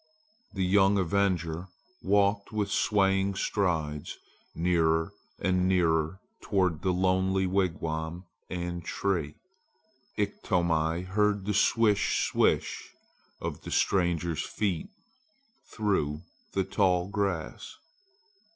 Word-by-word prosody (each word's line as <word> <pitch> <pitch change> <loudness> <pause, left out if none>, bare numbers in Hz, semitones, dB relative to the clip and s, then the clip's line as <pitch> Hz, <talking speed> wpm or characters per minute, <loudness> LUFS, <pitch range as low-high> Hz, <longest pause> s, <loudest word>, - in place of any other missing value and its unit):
The 95 -2 0
young 100 +1 +4
avenger 90 -3 0 0.3
walked 100 +1 +2
with 105 -2 -1
swaying 95 -1 +2
strides 80 -8 -1 0.4
nearer 80 -1 +1 0.2
and 90 -1 +1
nearer 85 -1 +1 0.2
toward 90 -6 0
the 95 - +1
lonely 95 +1 +1
wigwam 85 -2 -2 0.2
and 85 -1 -4
tree. 85 -6 -2 0.8
Iktomi 85 -5 0
heard 100 +1 +1
the 105 - 0
swish! 105 -1 +3
swish! - - +1 0.5
of - - -5
the - - -8
stranger's 85 -4 +1
feet 100 - -2 0.8
through 85 -8 -1 0.3
the 95 - +1
tall 90 -3 +1
grass. 100 -5 -3
95 Hz, 95 wpm, -28 LUFS, 85-100 Hz, 0.8 s, young